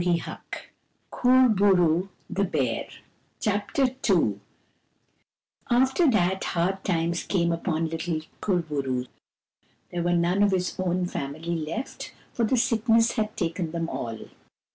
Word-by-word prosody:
214 175 -1 -2 0.6
KUR 255 +1 +5
BO 205 -2 +3
ROO, 175 +2 +2 0.2
THE 200 - -1
BEAR 130 -10 -1 0.5
Chapter 215 +8 +1 0.2
II 115 - +3 1.3
After 265 +6 +4
that, 190 -4 +2
hard 190 +2 -1
times 170 -1 0
came 170 -3 +1
upon 165 -1 -1
little 160 0 -2 0.2
Kur 180 -4 +1
bo 150 -3 -2
roo. 130 -2 -2 0.9
There 175 - -2
were 175 +1 +1
none 175 +3 +2
of 205 - +5
his 180 -1 0
own 180 0 0
family 160 +1 -4
left, 165 - -5 0.2
for 235 - 0
the 250 +4 +1
sickness 230 -1 +3
had 215 -2 -2
taken 170 -1 -2
them 165 -1 -2
all. 115 -2 -4
175 Hz, 135 wpm, -26 LUFS, 165-210 Hz, 1.3 s, KUR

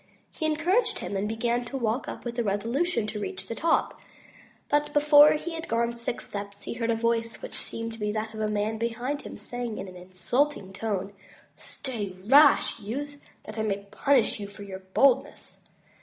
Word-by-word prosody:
He 315 - -2
encouraged 335 +10 +2
himself, 195 - -3
and 210 +2 -1
began 235 +2 0
to 270 +3 -4
walk 235 +1 -1
up - - -7
with 240 0 -3
a - - +2
resolution 230 - 0
to 215 0 -4
reach 190 -2 -4
the 230 - -4
top; 325 +7 +1 0.7
but 295 0 +1
before 295 0 +8
he 330 +3 -3
had 330 +1 -5
gone 235 +1 0
six 235 +1 -4
steps, 200 0 -7
he - - -4
heard 230 0 -2
a 230 - +3
voice, 230 0 0
which - - -7
seemed 230 0 -5
to 225 - -11
be 210 0 0
that 215 +1 -3
of 220 - -7
a 215 -1 0
man 210 +1 -1
behind 240 +5 -2
him, - - -8
saying 245 -4 -5
in 195 - -5
an 185 - -10
insulting 190 +5 -1
tone, 200 -1 -3 0.4
"Stay, 215 -8 -5
rash 280 +1 +6
youth, 285 +7 -5 0.2
that 215 +1 -7
I - - +2
may 200 -2 -1
punish 275 -6 +2
you 200 - -5
for 200 +1 -11
your 190 -1 -7
boldness." 250 +8 +1
230 Hz, 195 wpm, -27 LUFS, 205-275 Hz, 0.7 s, before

